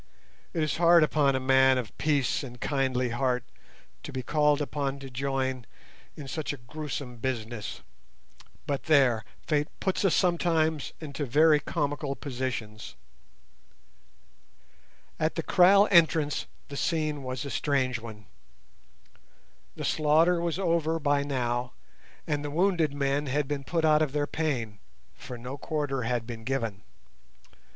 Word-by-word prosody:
It 165 Hz, -3 st, -1 dB
is 155 Hz, -, -1 dB
hard 170 Hz, -1 st, +6 dB
upon 145 Hz, -3 st, +2 dB
a -, -, +1 dB
man 130 Hz, 0 st, +4 dB
of 120 Hz, -4 st, -5 dB
peace 145 Hz, -5 st, +1 dB
and 125 Hz, -3 st, -9 dB
kindly 130 Hz, -3 st, 0 dB
heart 125 Hz, 0 st, 0 dB, 0.6 s
to -, -, -8 dB
be 130 Hz, -1 st, -4 dB
called 150 Hz, +1 st, +2 dB
upon 140 Hz, -2 st, -2 dB
to 135 Hz, -1 st, -10 dB
join 130 Hz, -1 st, -2 dB, 0.5 s
in 145 Hz, -, -8 dB
such 155 Hz, +1 st, -3 dB
a 145 Hz, -, -6 dB
gruesome 135 Hz, 0 st, -6 dB
business. 115 Hz, -3 st, -4 dB, 0.8 s
But 140 Hz, -2 st, -3 dB
there, 130 Hz, -7 st, +4 dB, 0.2 s
fate 150 Hz, -1 st, +1 dB
puts 190 Hz, +1 st, -1 dB
us 195 Hz, -, +3 dB
sometimes 165 Hz, -4 st, +1 dB
into 145 Hz, -2 st, -5 dB
very 150 Hz, +4 st, +5 dB
comical 145 Hz, -3 st, -2 dB
positions! 125 Hz, -6 st, -5 dB, 2.2 s
At 155 Hz, +1 st, 0 dB
the 165 Hz, -, -2 dB
kraal 195 Hz, +5 st, +6 dB
entrance 160 Hz, -4 st, +3 dB, 0.2 s
the 140 Hz, -, -6 dB
scene 155 Hz, -3 st, -1 dB
was 130 Hz, 0 st, -4 dB
a 140 Hz, -, -5 dB
strange 130 Hz, -4 st, 0 dB
one. 110 Hz, -3 st, -10 dB, 1.5 s
The -, -, -5 dB
slaughter 160 Hz, +3 st, +3 dB
was 170 Hz, -1 st, -1 dB
over 165 Hz, -3 st, +1 dB
by 145 Hz, -2 st, +1 dB
now, 125 Hz, -3 st, -2 dB, 0.5 s
and 145 Hz, -1 st, -1 dB
the 145 Hz, -, -3 dB
wounded 170 Hz, -1 st, +2 dB
men 140 Hz, +1 st, -1 dB
had 140 Hz, +1 st, 0 dB
been 140 Hz, -1 st, -3 dB
put 165 Hz, +2 st, 0 dB
out 155 Hz, 0 st, +5 dB
of 150 Hz, -3 st, 0 dB
their 145 Hz, -1 st, +1 dB
pain, 125 Hz, -11 st, -2 dB, 0.3 s
for 125 Hz, -, -9 dB
no 125 Hz, +4 st, -7 dB
quarter 145 Hz, -4 st, -2 dB
had 120 Hz, -1 st, -1 dB
been 115 Hz, -1 st, -7 dB
given. 115 Hz, -5 st, -2 dB
140 Hz, 140 wpm, -28 LUFS, 130-155 Hz, 2.2 s, hard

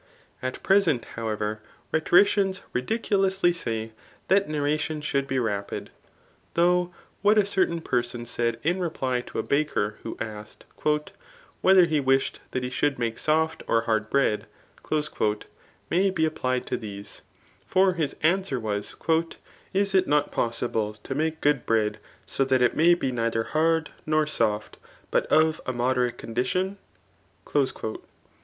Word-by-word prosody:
At 130 Hz, 0 st, -4 dB
present, 190 Hz, -, +3 dB
however, 110 Hz, -1 st, -3 dB, 0.3 s
rhetoricians 195 Hz, +4 st, +3 dB
ridiculously 195 Hz, -, +1 dB
say 115 Hz, -8 st, -4 dB, 0.4 s
that 195 Hz, -2 st, +3 dB
narration 155 Hz, +1 st, -1 dB
should 140 Hz, -2 st, -1 dB
be 135 Hz, -, -1 dB
rapid; 105 Hz, -5 st, -2 dB, 0.6 s
though 180 Hz, +1 st, +3 dB, 0.3 s
what 210 Hz, +2 st, +4 dB
a 210 Hz, -, +5 dB
certain 185 Hz, -4 st, +1 dB
person 120 Hz, -3 st, -2 dB
said 115 Hz, -1 st, -1 dB
in 175 Hz, +5 st, +1 dB
reply 130 Hz, -8 st, -1 dB
to -, -, -9 dB
a -, -, 0 dB
baker, 140 Hz, -8 st, 0 dB
who 115 Hz, -, -6 dB
asked, 105 Hz, -1 st, -7 dB, 0.2 s
*^ 150 Hz, 0 st, +1 dB, 0.5 s
whether 190 Hz, -1 st, +7 dB
he 155 Hz, -3 st, +1 dB
wished 135 Hz, -1 st, +1 dB
that 130 Hz, -, -3 dB
he 125 Hz, -, -3 dB
should 145 Hz, +1 st, +1 dB
make 115 Hz, -2 st, -2 dB
soft 160 Hz, +1 st, +1 dB
or 115 Hz, -, +3 dB
hard 110 Hz, -1 st, 0 dB
bread," 135 Hz, -6 st, +1 dB, 1.4 s
may 190 Hz, +3 st, +3 dB
be 170 Hz, -4 st, +1 dB
applied 130 Hz, -5 st, -1 dB
to -, -, -2 dB
these. 100 Hz, -2 st, -8 dB, 0.5 s
For 190 Hz, 0 st, +4 dB
his 160 Hz, -5 st, -2 dB
answer 175 Hz, -5 st, +2 dB
was, 105 Hz, -2 st, -3 dB
*^ 165 Hz, 0 st, 0 dB, 0.4 s
Is 200 Hz, 0 st, +1 dB
it 190 Hz, -1 st, +4 dB
not 145 Hz, 0 st, +2 dB
possible 115 Hz, -2 st, -1 dB
to 105 Hz, +5 st, -6 dB
make 160 Hz, +3 st, -1 dB
good 145 Hz, -3 st, +2 dB
bread, 105 Hz, -2 st, +1 dB, 0.3 s
so 135 Hz, -, 0 dB
that 130 Hz, -1 st, +3 dB
it 125 Hz, -, +2 dB
may 170 Hz, +2 st, +5 dB
be 135 Hz, -6 st, -2 dB
neither 115 Hz, -2 st, 0 dB
hard 160 Hz, +3 st, +1 dB, 0.2 s
nor 155 Hz, 0 st, +3 dB
fioft, 110 Hz, -8 st, -1 dB, 0.3 s
but -, -, +1 dB
of 155 Hz, 0 st, +3 dB
a 130 Hz, -, -1 dB
moderate 125 Hz, 0 st, 0 dB
condition 185 Hz, -, -2 dB
145 Hz, 145 wpm, -26 LUFS, 115-170 Hz, 1.4 s, whether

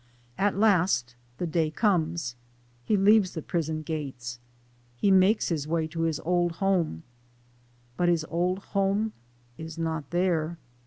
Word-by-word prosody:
At 200 Hz, 0 st, +1 dB
last 185 Hz, -, +2 dB, 0.2 s
the -, -, -2 dB
day 160 Hz, -1 st, +1 dB
comes 165 Hz, -, 0 dB, 0.5 s
he 210 Hz, -, +2 dB
leaves 200 Hz, -1 st, +4 dB
the 160 Hz, -, -4 dB
prison 160 Hz, -2 st, -2 dB
gates 135 Hz, -6 st, -5 dB, 0.6 s
he 195 Hz, +10 st, +2 dB
makes 190 Hz, +3 st, +4 dB
his 155 Hz, -4 st, -2 dB
way 160 Hz, 0 st, 0 dB
to 165 Hz, +1 st, -4 dB
his 165 Hz, -2 st, 0 dB
old 175 Hz, 0 st, +1 dB
home, 175 Hz, -, 0 dB, 0.9 s
but 175 Hz, -1 st, +2 dB
his 165 Hz, -2 st, +1 dB
old 180 Hz, +2 st, 0 dB, 0.2 s
home 200 Hz, +2 st, +1 dB, 0.5 s
is 160 Hz, 0 st, -7 dB
not 160 Hz, -3 st, -3 dB
there. 170 Hz, -2 st, 0 dB
170 Hz, 140 wpm, -27 LUFS, 155-190 Hz, 0.9 s, leaves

